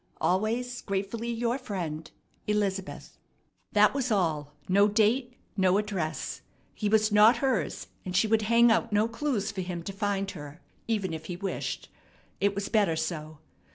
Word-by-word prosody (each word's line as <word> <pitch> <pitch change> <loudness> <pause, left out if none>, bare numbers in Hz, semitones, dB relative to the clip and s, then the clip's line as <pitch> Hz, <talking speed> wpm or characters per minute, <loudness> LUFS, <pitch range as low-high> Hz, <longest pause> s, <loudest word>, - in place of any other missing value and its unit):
Always 230 +6 0
gratefully 200 +4 -3
your 235 +2 -1
friend, 170 - -5 0.4
"ELIZABETH." 200 -2 -2 0.5
That 210 0 +5
was 265 -3 -1
all, 155 -7 0
no 200 +2 +5
date, 230 +4 +2 0.2
no 190 -1 +3
address. 195 -7 -3 0.3
He 210 - -1
was 215 0 +3
not 210 +4 +7
hers, 265 -4 -1 0.2
and 185 -1 -5
she 195 - +4
would 220 0 +2
hang 235 0 +6
out 230 0 +1
no 210 +2 +3
clues 230 -3 -2
for 195 -2 -4
him 175 -2 -5
to 195 - -5
find 200 0 -1
her, 145 -3 -9 0.3
even 200 -6 -1
if 160 0 -6
he 180 - -4
wished. 195 +2 -4 0.5
It 200 0 +1
was 200 0 -2
better 205 -7 +2
so. 155 -1 -4
205 Hz, 155 wpm, -28 LUFS, 185-225 Hz, 0.5 s, not